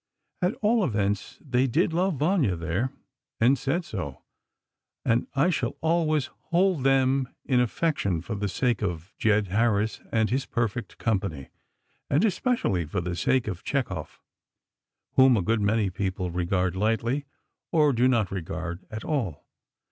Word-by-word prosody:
At 180 +4 +1
all 220 +1 +4
events 105 - -1
they 130 +1 +2
did 160 +7 +1
love 180 +1 +1
"Vanya," 150 - +2
there, 90 +10 -1 0.5
and 125 +4 +5
said 145 +6 -1
so, 80 -11 -6 0.8
and 115 +1 +2
I 145 +7 +3
shall 130 -7 -2
always 160 -3 +1 0.2
hold 175 -4 +2
them 135 -1 +3 0.2
in 130 -3 +3
affection 120 - 0
for 100 - -5
the 105 0 -2
sake 120 +2 0
of 90 -3 -3
Jed 105 -2 +2
Harris 110 +1 +1
and 110 -1 +1
his 135 +1 0
perfect 115 0 -2
company, 95 - -2 0.6
and 155 +10 +3
especially 205 - +1
for 90 +5 -2
the 90 0 -3
sake 120 +8 +1
of 95 -5 -4
Chekhov, 95 - -3 1.0
whom 130 -2 +7
a 95 - 0
good 110 +3 +1
many 105 -1 +2
people 95 -1 -2
regard 90 +1 0
lightly, 115 +7 0 0.5
or 150 -3 +4
do 125 +1 +3
not 115 -7 +2
regard 90 -1 -4
at 110 0 -6
all. 120 - -2
115 Hz, 150 wpm, -26 LUFS, 95-140 Hz, 1.0 s, whom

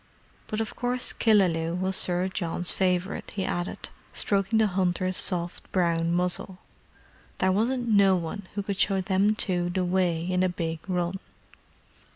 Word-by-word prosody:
"But 215 - -3
of 225 - -3
course 250 0 -2
Killaloe 175 -7 +2
was 185 +1 -1
Sir 180 0 +1
John's 175 -2 -1
favourite," 185 0 -1
he 195 -2 -1
added, 175 -1 -3 0.2
stroking 200 +2 +1
the 220 - +4
hunter's 185 -1 0
soft 175 -2 -1
brown 170 -2 +1
muzzle. 180 +1 0 0.8
"There 185 - +2
wasn't 240 +5 0
no 200 -3 +5
one 180 +3 -4
could 200 -1 -3
show 195 -1 +2
them 195 +3 +2
two 175 -4 0
the 180 +1 -1
way 175 -2 +1
in 180 0 0
a 185 - +3
big 165 -2 -3
run." 180 0 -1
185 Hz, 150 wpm, -27 LUFS, 175-200 Hz, 0.8 s, no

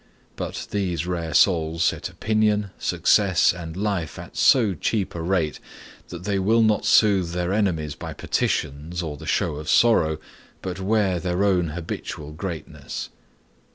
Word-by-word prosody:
But - - -5
these 90 -6 -1
rare 85 -4 -3
souls 85 -3 +3
set - - 0
opinion, 105 -2 0
success, 95 -5 +3
and 85 -1 -7
life 95 -7 -2
at - - -10
so 115 -7 +4
cheap 100 +4 -1
a 85 - -5
rate 85 -3 0 0.5
that 85 0 -8
they 100 0 0
will 110 +4 +3
not 110 -1 +2
soothe 95 -6 +4
their 90 +1 -1
enemies 85 -8 0
by - - -7
petitions, 80 +5 -2
or 75 -3 -4
the - - -10
show 75 - 0
of 75 +1 -6
sorrow, 85 -11 +4 0.5
but 95 0 -4
wear 95 -2 +1
their 90 +2 -1
own 90 -4 +2
habitual 80 -2 -6
greatness. 85 -1 -6
90 Hz, 150 wpm, -24 LUFS, 80-100 Hz, 0.5 s, so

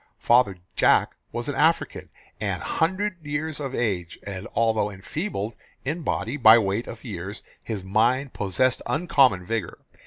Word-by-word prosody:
Father 120 -6 +3 0.2
Jack - - +4 0.2
was - - -4
an - - -1
African, - - +1 0.3
an - - -2
hundred 185 +1 -1
years 155 +1 -3
of 135 -2 -4
age, 95 -8 -1
and 100 -1 -6
although 110 -2 +2
enfeebled 105 - -4 0.3
in 155 +6 -2
body 135 -2 -2
by 115 -4 +8
weight 105 +1 0
of 115 - -9
years, 100 -2 -6 0.2
his 105 -5 -5
mind 120 +7 +1
possessed 105 +6 +1
uncommon 125 - +3
vigour. 110 -3 -3
115 Hz, 145 wpm, -25 LUFS, 100-140 Hz, 0.3 s, by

